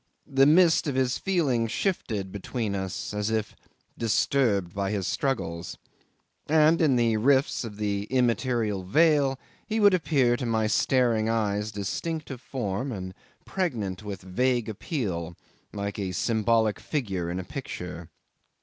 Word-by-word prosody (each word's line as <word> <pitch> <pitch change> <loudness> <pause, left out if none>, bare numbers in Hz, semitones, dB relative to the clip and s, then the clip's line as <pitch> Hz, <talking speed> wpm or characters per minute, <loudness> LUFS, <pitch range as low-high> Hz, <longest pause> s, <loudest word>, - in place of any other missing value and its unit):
The 135 0 +4
mist 165 +1 +5
of 140 - -1
his 130 -1 +1
feelings 135 - +1
shifted 110 - -2
between 105 +2 -3
us, 95 0 -4
as 105 +1 -1
if 110 -2 -2 0.4
disturbed 110 -4 +1
by 100 -1 -1
his 100 -3 -2
struggles, 110 -8 -2 0.7
and 160 +2 +4
in 145 -5 +4
the 115 -2 +2
rifts 135 +5 +2
of 105 -3 -7
the 100 -1 -1
immaterial 120 -4 0
veil 145 - +3 0.3
he 220 0 -1
would 205 -2 +6
appear 140 -8 +2
to 125 - -4
my 110 -1 +1
staring 115 0 +2
eyes 105 -2 0
distinct 150 - -4
of 130 -2 -7
form 125 0 -3
and 95 -4 -5 0.3
pregnant 115 - -2
with 100 -3 -7
vague 120 +5 0
appeal 95 - -4 0.3
like 100 0 -4
a 95 -2 -3
symbolic 110 +2 +1
figure 95 - -3
in 90 +2 -3
a - - -4
picture. 90 - -7
115 Hz, 140 wpm, -27 LUFS, 100-135 Hz, 0.7 s, would